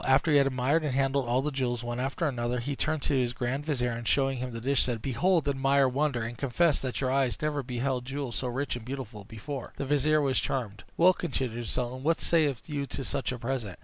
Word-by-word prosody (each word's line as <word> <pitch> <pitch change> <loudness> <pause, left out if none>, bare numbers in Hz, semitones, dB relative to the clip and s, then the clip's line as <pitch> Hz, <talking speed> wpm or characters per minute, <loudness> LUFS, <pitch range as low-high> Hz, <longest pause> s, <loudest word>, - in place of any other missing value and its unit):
After 135 +4 +3
he 145 - +6
had 140 -1 +5
admired 135 +5 +1
and 140 -4 -1
handled 135 -1 +1
all 125 +3 +2
the 150 - -1
jewels 125 -3 -1
one 120 0 -3
after 135 +6 -1
another, 120 -2 -1
he 140 +4 -3
turned 155 +1 -1
to - - 0
his 125 -3 +1
grand 130 +4 -2
vizier, 125 -5 0
and, 115 0 -5
showing 135 0 +2
him 125 +1 -3
the 115 - -5
dish, 135 +3 +2
said, 120 -3 0
"Behold! 150 +7 +1
admire! 135 0 +3
wonder! 135 -2 0
and 115 +1 -5
confess 145 +4 +2
that 130 0 -3
your 130 -1 +1
eyes 135 -2 +1
never 150 -1 -1
beheld 125 0 -2
jewels 135 -2 -4
so 130 - -1
rich 130 +2 -2
and 120 - -7
beautiful 115 -5 -6
before!" 120 +5 -7
The 140 - -2
vizier 145 +2 +3
was 135 -3 +2
charmed. 110 -6 -3
"Well," 180 +2 +6
continued 125 -10 -3
the - - -5
sultan, 125 +1 -2
"what 160 +4 +2
sayest 150 -7 +1
thou 145 -3 -3
to 135 0 -5
such 135 - -2
a 125 - -4
present? 120 -6 -3
135 Hz, 240 wpm, -29 LUFS, 120-140 Hz, -, he